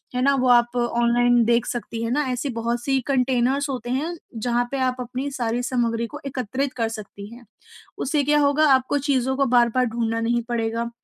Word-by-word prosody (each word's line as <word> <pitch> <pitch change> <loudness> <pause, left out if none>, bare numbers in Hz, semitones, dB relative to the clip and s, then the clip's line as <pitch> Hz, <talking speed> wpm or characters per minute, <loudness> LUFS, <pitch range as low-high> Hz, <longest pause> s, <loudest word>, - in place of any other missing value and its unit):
है 250 - 0
ना? 280 0 +4
वो 255 -1 +1
आप 240 0 +4
ऑनलाइन 240 0 +2
देख 235 0 +2
सकती 230 -1 -4
हैं 230 - -2
ना, 295 +3 +1
ऐसी 250 +3 -2
बहुत-सी 240 +3 -1
कंटेनर्स 265 +1 +1
होते 250 -2 -4
हैं 310 +7 -2 0.3
जहाँ 240 +1 +1
पे 275 - -2
आप 255 -1 +1
अपनी 255 +3 -4
सारी 240 -2 -2
सामग्री 235 -2 -1
को 295 +3 -9
एकत्रित 260 +1 -3
कर 225 -2 0
सकती 205 -2 -8
हैं। 240 -1 -15 0.5
उससे 285 +1 0
क्या 295 +1 +3
होगा 290 +1 +3
आपको 260 +2 +1
चीज़ों 265 -2 0
को 275 - +2
बार-बार 245 0 +3
ढूँढ़ना 230 -1 -2
नहीं 235 +1 0
पड़ेगा। 230 0 -1
245 Hz, 190 wpm, -23 LUFS, 235-270 Hz, 0.5 s, ना